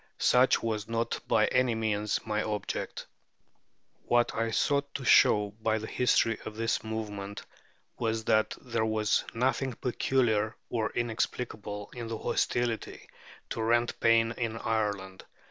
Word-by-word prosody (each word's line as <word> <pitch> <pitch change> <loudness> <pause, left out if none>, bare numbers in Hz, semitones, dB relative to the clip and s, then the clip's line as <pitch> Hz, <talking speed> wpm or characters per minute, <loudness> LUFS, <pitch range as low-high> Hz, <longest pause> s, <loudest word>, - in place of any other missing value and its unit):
Such 125 +1 +4
was 110 -2 -2
not 115 0 -1
by 110 -1 +4
any 125 -2 +2
means 105 -1 0
my 105 -1 0
object. 105 -1 -4 1.0
What 120 0 +2
I 115 0 -1
sought 140 +4 +1
to 135 - -4
show 105 -2 +5
by 110 0 +1
the 110 - -5
history 115 -2 +2
of 105 - -7
this 115 0 -1
movement 105 -2 -5 0.6
was 115 -1 -1
that 110 0 +2
there 115 -3 -2
was 110 -1 +1
nothing 130 +2 0
peculiar 115 -3 0 0.2
or 115 -2 0
inexplicable 110 -3 -3
in 120 -2 -6
the 115 0 -4
hostility 120 0 -2 0.4
to - - -2
rent 120 +1 +1
paying 115 0 +4
in 115 -2 -2
Ireland. 105 -4 -2
115 Hz, 135 wpm, -29 LUFS, 110-120 Hz, 1.0 s, show